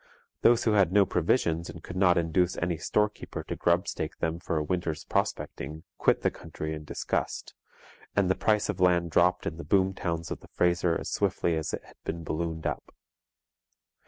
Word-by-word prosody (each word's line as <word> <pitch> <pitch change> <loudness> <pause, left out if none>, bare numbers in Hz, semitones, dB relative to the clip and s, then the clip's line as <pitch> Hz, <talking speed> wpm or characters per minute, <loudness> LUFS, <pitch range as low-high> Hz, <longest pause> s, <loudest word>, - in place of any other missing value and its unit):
Those 120 0 +5
who 110 - +3
had 100 -4 +4
no 100 0 +5
provisions 85 -2 +1
and 80 0 -9
could 90 - -8
not 90 -2 +4
induce 85 +2 +1
any 85 0 0
storekeeper 105 +5 -1
to - - -4
grubstake - - 0
them 80 +1 -1
for 85 -2 -2
a 75 - +1
winter's 80 -1 -2
prospecting, 75 +3 -2 0.2
quit - - +3
the - - +3
country 80 0 -6
in 75 -1 -7
disgust; - - -3 0.6
and 100 -2 +3
the 95 - +4
price 105 +2 +1
of 105 -3 -3
land 90 -2 +3
dropped 90 +2 +3
in 80 - -3
the 85 - -6
boom 95 -1 +2
towns 85 -3 -3
of - - -3
the - - -16
Fraser 85 -1 +2
as - - -5
swiftly 85 - +1
as 80 -1 -2
it - - -4
had - - -18
been 85 0 -4
ballooned 80 +1 -3
up. - - -4
85 Hz, 190 wpm, -28 LUFS, 80-95 Hz, 0.6 s, Those